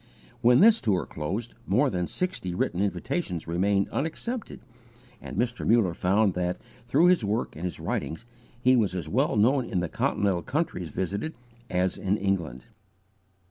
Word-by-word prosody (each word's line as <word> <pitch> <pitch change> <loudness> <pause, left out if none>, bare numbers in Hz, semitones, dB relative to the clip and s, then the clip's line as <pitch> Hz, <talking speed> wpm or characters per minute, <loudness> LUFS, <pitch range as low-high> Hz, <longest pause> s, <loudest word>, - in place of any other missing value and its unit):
When 125 +3 +6
this 225 +2 +6
tour 100 -6 +1
closed 95 +10 -4
more 135 +1 +3
than 90 -1 -1
sixty 180 - -3
written 90 0 -1
invitations 100 - -2
remained 95 +4 +1
unaccepted, 215 - -4 0.6
and - - -7
Mr. 120 0 -1
Muller 110 -6 +3
found 95 +3 +2
that, 90 0 -1 0.3
through 145 +7 +4
his 180 -8 +4
work 105 +3 -1
and 80 - -8
his 90 - -3
writings, 85 +9 -3 0.3
he 130 +1 +4
was 105 -7 +1
as 85 -4 -3
well 130 - +1
known 125 +6 +3
in 105 -6 -2
the 90 -2 -2
continental 95 -4 0
countries 135 - -2
visited, 100 - -3 0.3
as 90 0 0
in 100 +2 0
England. 85 - -2
100 Hz, 155 wpm, -27 LUFS, 90-125 Hz, 0.6 s, When